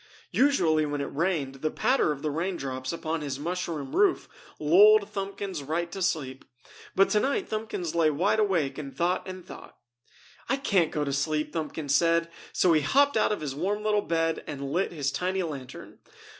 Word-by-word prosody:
Usually 170 Hz, -, +3 dB
when 145 Hz, 0 st, -3 dB
it 140 Hz, -, -4 dB
rained, 145 Hz, -5 st, -1 dB
the 155 Hz, -, 0 dB
patter 235 Hz, -, +1 dB
of 145 Hz, -2 st, -5 dB
the 155 Hz, -, -1 dB
raindrops 140 Hz, -6 st, -3 dB
upon 165 Hz, -1 st, -3 dB
his 140 Hz, -3 st, -4 dB
mushroom 160 Hz, -3 st, -4 dB
roof 395 Hz, -3 st, +3 dB, 0.3 s
lulled 200 Hz, +7 st, +6 dB
Thumbkins 195 Hz, -3 st, -4 dB
right 170 Hz, +4 st, -2 dB
to 195 Hz, -, -6 dB
sleep, 145 Hz, -8 st, -2 dB, 0.5 s
but 195 Hz, -, +4 dB
tonight 270 Hz, -, +1 dB
Thumbkins 215 Hz, -6 st, -3 dB
lay 165 Hz, -2 st, +3 dB
wide 180 Hz, +9 st, +1 dB
awake 175 Hz, -10 st, +1 dB
and 140 Hz, -2 st, -8 dB
thought 180 Hz, +3 st, 0 dB
and 185 Hz, -1 st, -8 dB
thought. -, -, -12 dB, 0.7 s
"I 270 Hz, -, +2 dB
can't 195 Hz, -, +2 dB
go 150 Hz, -, -1 dB
to 140 Hz, -, -2 dB
sleep!" 150 Hz, +2 st, -1 dB
Thumbkins 155 Hz, -3 st, -3 dB
said, 170 Hz, +1 st, +2 dB, 0.2 s
so 180 Hz, -2 st, +3 dB
he 155 Hz, -, +3 dB
hopped 280 Hz, -, +3 dB
out 215 Hz, -, +3 dB
of 210 Hz, -, -2 dB
his 145 Hz, -3 st, -3 dB
warm 200 Hz, +8 st, -2 dB
little 210 Hz, -1 st, +2 dB
bed 165 Hz, -3 st, -1 dB
and 140 Hz, -2 st, -5 dB
lit 180 Hz, +5 st, 0 dB
his 145 Hz, -5 st, -2 dB
tiny 185 Hz, +6 st, -1 dB
lantern. 140 Hz, -6 st, -8 dB
165 Hz, 180 wpm, -27 LUFS, 150-195 Hz, 0.7 s, lulled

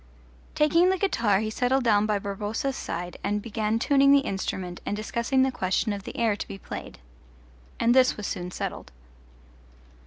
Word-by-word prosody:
Taking 335 Hz, +4 st, +4 dB
the 380 Hz, -, +2 dB
guitar 230 Hz, -, +1 dB
he 215 Hz, 0 st, -2 dB
settled 250 Hz, +3 st, +1 dB
down 210 Hz, -3 st, +3 dB
by 210 Hz, -1 st, +1 dB
Barboza's 205 Hz, +7 st, -3 dB
side 175 Hz, -3 st, -5 dB
and 210 Hz, +1 st, 0 dB
began 215 Hz, 0 st, -1 dB
tuning 275 Hz, +3 st, +4 dB
the 280 Hz, 0 st, +6 dB
instrument 185 Hz, -2 st, -4 dB
and 205 Hz, -, -3 dB
discussing 235 Hz, +4 st, 0 dB
the 265 Hz, -, +1 dB
question 190 Hz, 0 st, 0 dB
of 200 Hz, -1 st, -7 dB
the -, -, -7 dB
air 225 Hz, -3 st, +2 dB
to -, -, -6 dB
be -, -, -7 dB
played. -, -, -8 dB, 0.8 s
And 235 Hz, +1 st, +4 dB
this 255 Hz, 0 st, +4 dB
was 210 Hz, -, -5 dB
soon 180 Hz, 0 st, -4 dB
settled. -, -, -5 dB
215 Hz, 175 wpm, -26 LUFS, 200-260 Hz, 0.8 s, the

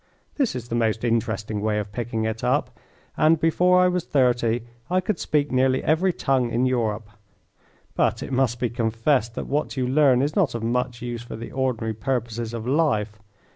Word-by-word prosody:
This 275 Hz, -, +1 dB
is 120 Hz, -1 st, -6 dB
the -, -, -4 dB
most 110 Hz, -1 st, 0 dB
interesting 110 Hz, -3 st, -1 dB
way 105 Hz, 0 st, 0 dB
of 105 Hz, -1 st, -4 dB
picking 115 Hz, 0 st, -3 dB
it 110 Hz, 0 st, -3 dB
up, -, -, 0 dB, 0.4 s
and 155 Hz, +1 st, +4 dB
before 180 Hz, +3 st, +3 dB
I 180 Hz, -, +5 dB
was 180 Hz, -1 st, 0 dB
thirty 120 Hz, -5 st, +1 dB, 0.3 s
I 185 Hz, +1 st, +2 dB
could 185 Hz, 0 st, -2 dB
speak 145 Hz, -1 st, 0 dB
nearly 130 Hz, 0 st, +2 dB
every 170 Hz, +5 st, +2 dB
tongue 130 Hz, -7 st, 0 dB
in 120 Hz, +2 st, +1 dB
Europe; 115 Hz, -4 st, -1 dB, 0.9 s
but -, -, 0 dB
it -, -, -7 dB
must 125 Hz, -2 st, +1 dB
be 120 Hz, -, -1 dB
confessed 115 Hz, +1 st, 0 dB
that -, -, -4 dB
what 145 Hz, 0 st, -2 dB
you 130 Hz, -1 st, 0 dB
learn 135 Hz, -1 st, +4 dB
is 150 Hz, +2 st, -1 dB
not 180 Hz, -, +2 dB
of 115 Hz, -, -4 dB
much 120 Hz, +1 st, -1 dB
use 120 Hz, -1 st, -4 dB
for 120 Hz, -, -8 dB
the 115 Hz, +1 st, -8 dB
ordinary 125 Hz, -4 st, -1 dB
purposes 115 Hz, 0 st, -3 dB
of 115 Hz, -1 st, -5 dB
life. 120 Hz, -7 st, 0 dB
120 Hz, 190 wpm, -24 LUFS, 115-140 Hz, 0.9 s, I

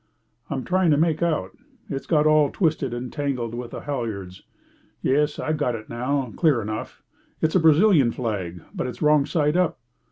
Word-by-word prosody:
"I'm 135 Hz, -2 st, -3 dB
trying 185 Hz, -1 st, +2 dB
to 145 Hz, -, +4 dB
make 160 Hz, 0 st, +1 dB
out. 155 Hz, -, 0 dB, 0.4 s
It's 135 Hz, -, -5 dB
got 150 Hz, -3 st, +3 dB
all 155 Hz, -2 st, +4 dB
twisted 155 Hz, -, 0 dB
and 120 Hz, +1 st, -5 dB
tangled 130 Hz, -6 st, -2 dB
with 120 Hz, 0 st, -5 dB
the -, -, -7 dB
halyards. 110 Hz, -10 st, -5 dB, 0.6 s
Yes, 150 Hz, +2 st, +2 dB
I've 155 Hz, 0 st, -1 dB
got 125 Hz, -5 st, 0 dB
it 110 Hz, -1 st, -9 dB
now, 125 Hz, +1 st, -2 dB
clear 155 Hz, -8 st, +3 dB
enough. 110 Hz, 0 st, -6 dB, 0.4 s
It's 160 Hz, -, +1 dB
the 185 Hz, -, +4 dB
Brazilian 160 Hz, -, +5 dB
flag, 95 Hz, -9 st, -4 dB
but -, -, -3 dB
it's 120 Hz, +1 st, -6 dB
wrong 150 Hz, -1 st, +4 dB
side 150 Hz, -2 st, +1 dB
up." 180 Hz, -2 st, +1 dB
140 Hz, 180 wpm, -24 LUFS, 120-155 Hz, 0.6 s, Brazilian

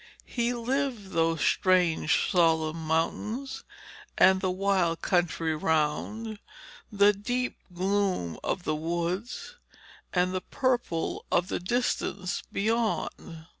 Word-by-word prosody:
He 240 Hz, -1 st, -1 dB
lived 240 Hz, -4 st, -2 dB
those 165 Hz, -1 st, +1 dB
strange 180 Hz, -4 st, +3 dB
solemn 160 Hz, -3 st, +2 dB
mountains 220 Hz, -, -1 dB, 0.5 s
and 190 Hz, 0 st, +6 dB
the 185 Hz, -, +1 dB
wild 185 Hz, -3 st, +1 dB
country 165 Hz, -3 st, +1 dB
round, 160 Hz, +9 st, -1 dB, 0.5 s
the 205 Hz, 0 st, +5 dB
deep 245 Hz, +5 st, -2 dB, 0.2 s
gloom 185 Hz, -, 0 dB
of 180 Hz, -, -2 dB
the 155 Hz, -, 0 dB
woods 175 Hz, -, -3 dB, 0.5 s
and 180 Hz, 0 st, +1 dB
the 185 Hz, -, -1 dB
purple 240 Hz, -7 st, -1 dB
of 175 Hz, +2 st, +2 dB
the -, -, -1 dB
distance 190 Hz, -2 st, -1 dB
beyond. 215 Hz, -6 st, -1 dB
185 Hz, 105 wpm, -28 LUFS, 165-220 Hz, 0.5 s, and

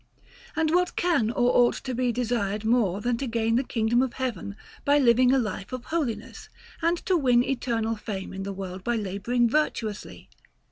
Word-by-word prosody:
And 320 Hz, -1 st, +1 dB
what 360 Hz, 0 st, +2 dB
can 325 Hz, -11 st, +2 dB
or 245 Hz, +1 st, +2 dB
ought 245 Hz, -1 st, +4 dB
to 260 Hz, -, -3 dB
be 250 Hz, 0 st, +1 dB
desired 220 Hz, -3 st, -1 dB
more 215 Hz, -5 st, +2 dB
than 240 Hz, +1 st, 0 dB
to 275 Hz, -, -2 dB
gain 225 Hz, -1 st, 0 dB
the 255 Hz, -, +2 dB
kingdom 235 Hz, 0 st, +1 dB
of 260 Hz, -2 st, -1 dB
Heaven 230 Hz, -6 st, -4 dB, 0.3 s
by 285 Hz, +1 st, +4 dB
living 250 Hz, -2 st, +5 dB
a 270 Hz, -, +4 dB
life 210 Hz, -4 st, -3 dB
of 255 Hz, -1 st, -6 dB
holiness, 300 Hz, -9 st, -3 dB, 0.3 s
and 335 Hz, +1 st, +2 dB
to 375 Hz, -, +2 dB
win 250 Hz, -6 st, +4 dB
eternal 235 Hz, -4 st, -1 dB
fame 200 Hz, -4 st, -6 dB
in 190 Hz, -, -5 dB
the 200 Hz, +1 st, -4 dB
world 190 Hz, -1 st, -6 dB
by 240 Hz, +3 st, 0 dB
labouring 220 Hz, +4 st, 0 dB
virtuously? 225 Hz, -6 st, -2 dB
240 Hz, 185 wpm, -26 LUFS, 215-260 Hz, 0.3 s, living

